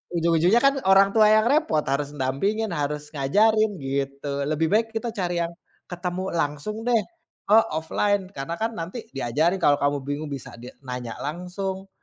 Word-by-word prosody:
Ujung-ujungnya 170 +6 +3
kan 275 0 +4
orang 195 +1 +6
tua 215 -1 +6
yang 215 0 +5
repot 280 - +2
harus 140 +1 -1
dampingin, 170 +12 -1
harus 150 0 -3
ngajarin 215 +10 +3
gitu. 140 +1 -3
Lebih 155 +2 +1
baik 225 +1 +3
kita 225 +2 -2
cari 175 -4 -1
yang 170 0 -5 0.4
ketemu 180 +1 -4
langsung 165 +8 -2
deh, 240 -2 +4 0.5
eee, 220 +2 +6
offline 190 +5 0
karena 135 +5 -4
kan 225 +1 0
nanti 180 +8 -6
diajarin, 145 +8 +1
kalau 145 0 +5
kamu 145 0 +2
bingung 145 +2 -4
bisa 135 -2 -6
di 125 - -9 0.2
nanya 125 -2 -5
langsung, 185 +5 -4
170 Hz, 160 wpm, -24 LUFS, 145-205 Hz, 0.5 s, orang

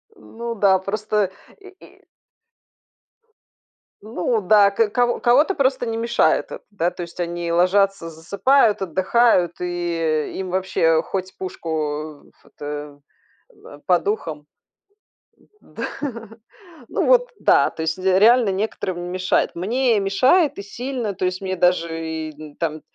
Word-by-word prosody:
Ну 235 - -7
да, 195 -2 +3
просто 205 0 -1 0.3
и 390 - -15 0.2
и - - -21 2.0
Ну 215 +1 -2
да, 200 +1 +5
ко 210 +2 +1
ко 240 +2 +1
кого-то 285 +10 +3
просто 260 -3 +1
не 225 0 -2
мешает 235 +1 +1
это. - - -7
Да, 180 -4 -1
то 180 - -9
есть, 170 +1 -9
они 170 0 -3
ложатся, 185 +1 +2
засыпают, 200 - +2
отдыхают, 190 0 +2
и, - - -4 0.3
э, 155 -2 -1
им 185 -1 -4
вообще 165 -3 +1
хоть 190 +2 -5
пушку, 185 -3 -7 0.6
э, - - -21
ф - - -32
это, 145 0 -8 0.5
в - - -19
э, 145 - -12
под 180 0 +2
ухом. 160 -8 -3 1.2
Да. - - -6 1.0
Ну - - -1
вот - - +4
да, - - +4
то - - -7
есть 160 +3 -2
де 190 0 +3
реально 235 +1 +5
некоторым 190 -2 -3
не 175 - -6
мешает. 185 +1 0
Мне 230 +5 +1
мешает 260 - +2
и - - -3
сильно, 240 0 -4
то 185 - -2
есть 185 +1 -2
мне 190 -1 -3
даже 170 -2 0 0.2
и 150 -1 -12
там, 155 -2 -2
190 Hz, 145 wpm, -21 LUFS, 170-225 Hz, 2.0 s, да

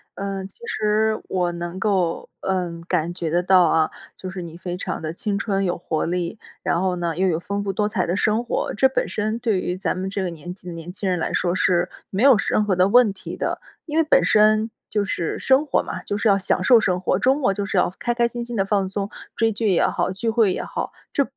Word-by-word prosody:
嗯， 195 -1 -4
其 - - -18
实 220 - +1
我 180 -2 0
能 170 +1 -5
够， 190 -4 0
嗯， 180 -3 -2
感 165 +2 0
觉 175 -2 -3
得 175 +3 +1
到 185 0 +6
啊， 160 -1 +2 0.2
就 185 - -7
是 185 0 -6
你 170 -1 -8
非 175 0 -5
常 - - -4
地 155 -1 -3
青 200 +3 -2
春 195 -1 0
有 175 - -1
活 160 -2 -2
力， 175 +4 -2 0.2
然 170 - +1
后 185 -1 +1
呢 170 -2 -2
也 190 +1 +2
有 165 -3 +1
非 - - -5
常 - - -31
丰 200 0 -1
富 195 - -1
多 210 +2 0
彩 205 -4 0
的 175 - -1
生 215 +4 +1
活， - - -1
这 265 +5 +5
本 265 - -1
身 215 +2 -2
对 220 -5 +1
于 180 - -2
咱 185 - -2
们 190 +1 -3
这 195 0 -2
个 180 - -1
年 170 +1 -8
纪 180 -1 -14
的 175 - -5
年 165 +1 -7
轻 195 0 -2
人 180 -1 0
来 - - -2
说 175 -1 +1
是 180 -1 +2 0.2
没 200 +4 -1
有 265 -5 +7
任 215 - +2
何 205 -3 +1
的 185 +1 +5
问 240 0 +5
题 195 - -8
的。 - - -2 0.3
因 310 -1 -3
为 325 - +5
本 300 - +4
身 215 +1 +4 0.2
就 210 - 0
是 175 -4 -2
生 270 +3 +3
活 280 - +1
嘛， - - -5
就 205 - -2
是 210 - +2
要 200 - +5
享 185 -1 0
受 235 +4 +7
生 180 -4 0
活， 185 0 +1
周 260 +6 +4
末 260 -9 +1
就 200 +1 -3
是 200 - -4
要 - - +3
开 240 - 0
开 235 0 +2
心 240 0 -5
心 240 0 -6
地 195 - +2
放 195 -1 +1
松， 200 +1 -3 0.3
追 225 0 +2
剧 215 0 0
也 180 - +3
好， - - 0
聚 195 +5 -2
会 220 -4 +3
也 - - -3
好， - - -4 0.2
这 280 - +2
195 Hz, 280 characters per minute, -22 LUFS, 180-215 Hz, 0.3 s, 有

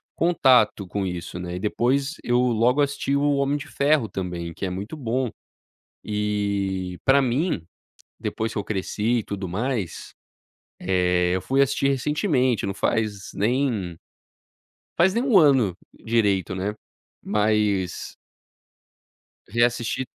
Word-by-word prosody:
contato 130 - +3
com 100 +2 -2
isso, 90 -1 -5
né. 90 0 -5
E - - -4
depois, 135 - 0
eu 120 0 +2
logo 125 +3 +3
assisti 140 -1 0
o 145 0 +2
Homem 140 +1 +1
de 145 - -8
Ferro 145 -4 +2
também, 90 -4 -5
que 100 - -4
é - - -2
muito 100 +9 -5
bom. 125 -1 -1 0.8
E, 100 -3 -2
pra 135 +1 +5
mim, 130 - 0 0.5
depois 110 0 -3
que - - -3
eu 100 - -3
cresci 105 +3 -1
e - - -1
tudo 100 -2 -5
mais, 105 -1 -3 0.7
eh, 90 -1 +2
eu 95 - 0
fui 135 +1 +1
assistir 135 0 +1
recentemente, 135 - +1
não 100 - -1
faz 105 -2 -1
nem, 110 -6 0 1.0
faz 185 +3 +4
nem 235 - +1
1 245 -7 +5
ano 130 - +4 0.3
direito, 100 -6 +1
né? 100 +3 -2 0.5
Mas 105 -3 0 1.3
reassisti, 120 +3 0
110 Hz, 130 wpm, -24 LUFS, 95-135 Hz, 1.3 s, pra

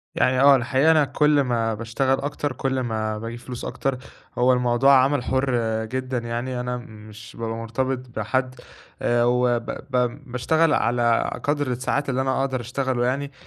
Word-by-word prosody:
يعني 130 0 +2
آه، 140 0 +8
الحقيقة، 130 +5 +3
أنا 155 -3 +4
كل 150 +2 +3
ما 115 -4 0
باشتغل 115 +4 -1
أكتر، 145 0 -3
كل 130 +1 -1
ما 110 -3 -2
باجيب 115 +2 -6
فلوس 125 -1 -7
أكتر. 135 -1 -2 0.4
هو 125 +1 +4
الموضوع 125 +2 +3
عمل 140 -2 +1
حُر 130 +1 0 0.3
جدًا 130 +2 -3
يعني، 120 +2 -3
أنا 125 0 -3
مش 110 -1 -12
بابقى 115 0 -3
مرتبط 125 +3 -2 0.2
بحد، 130 +4 -1 0.5
آآ، 120 0 +2
وب 120 -1 +2
ب 125 +1 -2
باشتغل 155 +5 +2
على 120 -1 +2
قدر 145 -1 0
الساعات 135 +3 -1
اللي 130 0 0
أنا 130 0 0
أقدر 130 -2 -1
أشتغله 125 0 -1
يعني. 140 +3 -2
125 Hz, 160 wpm, -23 LUFS, 120-135 Hz, 0.5 s, آه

